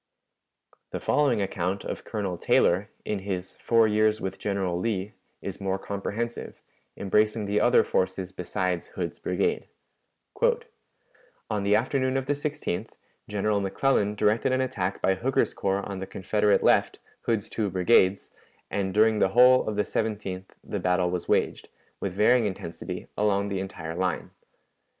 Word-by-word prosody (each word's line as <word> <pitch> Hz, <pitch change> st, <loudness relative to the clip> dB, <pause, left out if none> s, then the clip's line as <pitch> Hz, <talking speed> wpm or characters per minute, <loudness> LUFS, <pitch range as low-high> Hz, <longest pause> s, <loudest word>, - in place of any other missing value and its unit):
The -, -, -4 dB
following 130 Hz, -8 st, +2 dB
account 95 Hz, 0 st, -2 dB
of -, -, -5 dB
Colonel 100 Hz, -5 st, -3 dB
Taylor, 90 Hz, +3 st, +2 dB, 0.2 s
in 105 Hz, -, -1 dB
his 95 Hz, -2 st, -5 dB
"Four 115 Hz, -1 st, +3 dB
Years 110 Hz, 0 st, +2 dB
with 95 Hz, -, -4 dB
General 95 Hz, -4 st, -1 dB
Lee," 100 Hz, -1 st, -2 dB, 0.3 s
is -, -, -6 dB
more 95 Hz, 0 st, 0 dB
comprehensive, 100 Hz, +4 st, -5 dB, 0.3 s
embracing 105 Hz, +2 st, +1 dB
the 100 Hz, +1 st, +1 dB
other 465 Hz, -, +5 dB
forces 475 Hz, +2 st, -1 dB
besides -, -, -2 dB
Hood's -, -, -5 dB
brigade: 445 Hz, 0 st, -1 dB, 1.8 s
"On 105 Hz, -1 st, 0 dB
the 100 Hz, +1 st, +3 dB
afternoon 130 Hz, +1 st, +1 dB
of 135 Hz, -, -2 dB
the 145 Hz, -, +1 dB
16th, 145 Hz, -, -3 dB, 0.4 s
General 105 Hz, 0 st, +1 dB
McClellan 105 Hz, +1 st, +1 dB
directed 110 Hz, +5 st, +2 dB
an 130 Hz, 0 st, +2 dB
attack 100 Hz, -8 st, -2 dB
by 95 Hz, -, +4 dB
Hooker's 125 Hz, +8 st, 0 dB
corps 100 Hz, 0 st, -1 dB
on 100 Hz, -2 st, -5 dB
the 95 Hz, -, -5 dB
Confederate 105 Hz, +2 st, +1 dB
left -, -, +3 dB, 0.3 s
Hood's 110 Hz, -4 st, +1 dB
two 105 Hz, -3 st, -2 dB
brigades 95 Hz, +1 st, +3 dB, 0.4 s
and 95 Hz, -1 st, -1 dB
during 110 Hz, 0 st, +4 dB
the 95 Hz, -, +3 dB
whole 125 Hz, +3 st, +6 dB
of 105 Hz, -, -3 dB
the 105 Hz, -, +2 dB
17th 100 Hz, -4 st, -3 dB, 0.2 s
the -, -, -4 dB
battle 90 Hz, -1 st, +1 dB
was 90 Hz, -1 st, -3 dB
waged, -, -, 0 dB, 0.3 s
with 100 Hz, -2 st, -3 dB
varying 110 Hz, +3 st, +4 dB
intensity, 90 Hz, -3 st, -6 dB
along 100 Hz, -1 st, +1 dB
the 100 Hz, -1 st, -2 dB
entire 90 Hz, -4 st, -5 dB
line. 90 Hz, -1 st, -2 dB
100 Hz, 150 wpm, -27 LUFS, 95-115 Hz, 1.8 s, whole